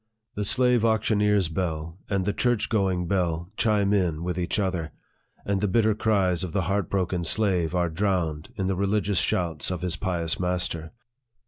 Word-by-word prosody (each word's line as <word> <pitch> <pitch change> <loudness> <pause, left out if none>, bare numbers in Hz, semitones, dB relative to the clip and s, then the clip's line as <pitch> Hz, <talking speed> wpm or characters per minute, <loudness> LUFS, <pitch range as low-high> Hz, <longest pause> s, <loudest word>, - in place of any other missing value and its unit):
The 105 - -2
slave 125 +1 +3
auctioneer's 105 -3 +2
bell 80 0 -3
and 100 -2 0
the 105 - 0
church 120 -3 0
going 95 -5 0
bell 85 -2 -1
chime 105 -3 +2
in 85 -5 0
with 90 0 -2
each 85 - -1
other, 90 -6 -2 0.5
and 100 -1 0
the 105 - +2
bitter 110 +2 +3
cries 100 -6 +1
of 90 -4 -5
the 95 - +1
heart 100 0 -1
broken 90 -2 -1
slave 90 -2 +1
are 90 -1 +2
drowned 80 -3 -1
in 95 - -2
the 95 - +1
religious 100 0 +1
shouts 85 -4 0
of 90 -2 -4
his 85 -2 -1
pious 85 -3 -1
master. 90 -3 -1
95 Hz, 175 wpm, -26 LUFS, 85-105 Hz, 0.5 s, slave